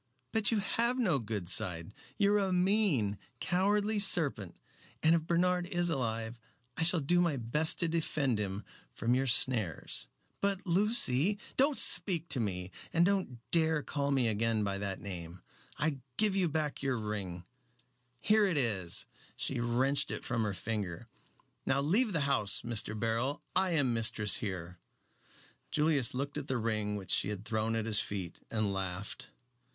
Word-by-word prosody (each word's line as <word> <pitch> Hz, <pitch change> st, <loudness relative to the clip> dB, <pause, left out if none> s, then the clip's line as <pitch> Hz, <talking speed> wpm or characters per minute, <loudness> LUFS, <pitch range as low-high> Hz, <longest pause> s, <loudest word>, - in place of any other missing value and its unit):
But 220 Hz, -1 st, +3 dB
you 225 Hz, -, +1 dB
have 235 Hz, +4 st, +1 dB
no 185 Hz, -, +2 dB
good 105 Hz, -5 st, -4 dB
side. 85 Hz, 0 st, -2 dB, 0.2 s
You 205 Hz, -1 st, +3 dB
are 210 Hz, -, +4 dB
a 195 Hz, -2 st, 0 dB
mean, 180 Hz, -, +2 dB, 0.2 s
cowardly 205 Hz, +4 st, +1 dB
serpent, 145 Hz, -, +3 dB, 0.5 s
and 160 Hz, +1 st, +5 dB
if 165 Hz, -1 st, 0 dB
Bernard 180 Hz, +1 st, +1 dB
is 175 Hz, -2 st, 0 dB
alive 115 Hz, -4 st, -2 dB, 0.4 s
I -, -, -4 dB
shall 165 Hz, 0 st, +5 dB
do 175 Hz, +5 st, +3 dB
my 165 Hz, -5 st, +1 dB
best 140 Hz, +7 st, 0 dB
to 170 Hz, -, +2 dB
defend 150 Hz, -7 st, 0 dB
him 100 Hz, 0 st, -4 dB, 0.3 s
from 115 Hz, +1 st, 0 dB
your 135 Hz, +1 st, +1 dB
snares." 115 Hz, -, +2 dB, 0.3 s
"But 200 Hz, -1 st, -1 dB
Lucy 190 Hz, -, +2 dB
" -, -, -20 dB
"Don't 280 Hz, +2 st, +3 dB
speak 170 Hz, -1 st, +3 dB
to 130 Hz, -, +1 dB
me, 95 Hz, -4 st, -3 dB, 0.2 s
and 170 Hz, -1 st, +3 dB
don't 190 Hz, -10 st, 0 dB
dare 160 Hz, -2 st, +3 dB
to -, -, -15 dB
call 140 Hz, -1 st, -2 dB
me 135 Hz, -4 st, +2 dB
again 110 Hz, 0 st, +1 dB
by 100 Hz, -1 st, -2 dB
that 100 Hz, -2 st, -4 dB
name. 90 Hz, -3 st, -8 dB, 0.3 s
I 150 Hz, -3 st, 0 dB, 0.2 s
give 210 Hz, -2 st, +2 dB
you 185 Hz, -3 st, +2 dB
back 150 Hz, -1 st, -2 dB
your 135 Hz, -2 st, 0 dB
ring 100 Hz, -5 st, -5 dB, 0.8 s
here 215 Hz, 0 st, +4 dB
it 175 Hz, -5 st, 0 dB
is!" 100 Hz, -10 st, -1 dB, 0.3 s
She 130 Hz, -, -2 dB
wrenched 125 Hz, +4 st, +1 dB
it -, -, -5 dB
from 115 Hz, -2 st, -1 dB
her 105 Hz, -3 st, -1 dB
finger. 105 Hz, 0 st, -4 dB, 0.5 s
"Now -, -, +1 dB
leave 205 Hz, -, +3 dB
the 165 Hz, -5 st, 0 dB
house, 130 Hz, -8 st, +1 dB
Mr. 110 Hz, -2 st, 0 dB
Beryl. 115 Hz, +5 st, -1 dB
I 190 Hz, -2 st, +3 dB
am 140 Hz, -6 st, +2 dB
mistress 110 Hz, -2 st, +2 dB
here." 90 Hz, -4 st, -5 dB, 0.9 s
Julius 150 Hz, -6 st, +1 dB
looked 140 Hz, +3 st, -3 dB
at 145 Hz, -, -8 dB
the 130 Hz, -, -1 dB
ring 110 Hz, -2 st, -1 dB
which 100 Hz, -2 st, -5 dB
she -, -, +1 dB
had 105 Hz, 0 st, -5 dB
thrown 110 Hz, 0 st, -1 dB
at 110 Hz, -1 st, -1 dB
his 110 Hz, -2 st, +2 dB
feet, 95 Hz, -4 st, -5 dB
and 110 Hz, -3 st, -1 dB
laughed. 95 Hz, +1 st, -5 dB
130 Hz, 170 wpm, -32 LUFS, 105-175 Hz, 0.9 s, and